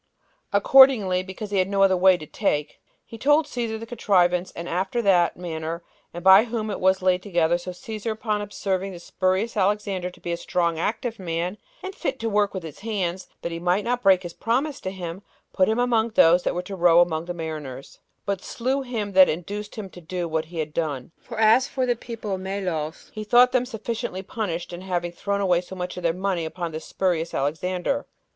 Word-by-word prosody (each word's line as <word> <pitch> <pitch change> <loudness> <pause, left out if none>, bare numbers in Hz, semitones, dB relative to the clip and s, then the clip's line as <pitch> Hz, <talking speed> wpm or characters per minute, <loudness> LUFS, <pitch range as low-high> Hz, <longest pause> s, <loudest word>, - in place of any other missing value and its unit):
Accordingly, 205 -4 +6
because 190 +3 -8
he 200 - +2
had 185 +1 +1
no 200 0 +3
other 190 -1 +5
way 185 0 +5
to 155 - -9
take, 150 -4 -2 0.3
he 230 - -11
told 290 +5 +4
Cæsar 235 -5 -3
the 230 - -7
contrivance, 180 -6 +1
and 170 +1 -6
after 190 +7 -1
what 180 -4 +3
manner 165 -1 -5 0.3
and 175 - -8
by 190 +4 +8
whom 225 -2 -3
it - - -4
was 190 0 +2
laid 185 -1 +3
together. 175 -3 +1
So 175 - -7
Cæsar, 220 +3 -6
upon 215 -1 -1
observing 195 -2 -3
the 175 - -9
spurious 185 +5 -1
Alexander 200 -2 0
to 180 - -17
be 175 - -5
a 170 - -1
strong 170 -1 -1
active 225 +4 -2
man, 175 +2 -3 0.2
and 380 +1 -5
fit 275 -8 -3
to 225 - -1
work 205 -1 +2
with 190 -3 -5
his 160 0 -9
hands, 190 -4 -3 0.2
that 170 - -3
he 165 - -4
might 180 +4 +1
not 245 +1 -1
break 190 -3 +4
his 175 -1 -7
promise 265 +6 -1
to - - -3
him, 180 -1 -6 0.3
put 185 0 +3
him 220 - +1
among 235 -2 +2
those 175 -5 +5
that - - -1
were 180 - -2
to 195 +2 -7
row 175 -2 +5
among 165 -2 +2
the 175 0 -5
mariners, 155 -5 -7 0.3
but 200 -2 -2
slew 260 +3 -1
him 230 -6 -4
that 190 -1 +7
induced 205 +6 -4
him 215 -3 -6
to 180 - -12
do 175 +1 -4
what 160 -1 -1
he 170 +1 -10
had 155 -1 -3
done; 150 -5 -3
for 230 - -9
as 225 +4 +5
for 260 -1 -1
the 245 -1 +1
people 225 -3 -6
of 190 - -3
Melos, 180 -5 -4
he 215 - -5
thought 245 +4 +5
them 250 -1 +1
sufficiently 230 -4 -4
punished, 180 -5 -4
in 175 - -7
having 175 -2 -2
thrown 200 +3 -2
away 180 -3 +3
so 180 +1 -10
much 180 -1 -4
of 180 - -6
their 170 -1 +2
money 185 0 -2
upon 170 +1 -4
this 155 0 -6
spurious 170 -3 -1
Alexander. 180 - -1
190 Hz, 215 wpm, -24 LUFS, 175-215 Hz, 0.3 s, by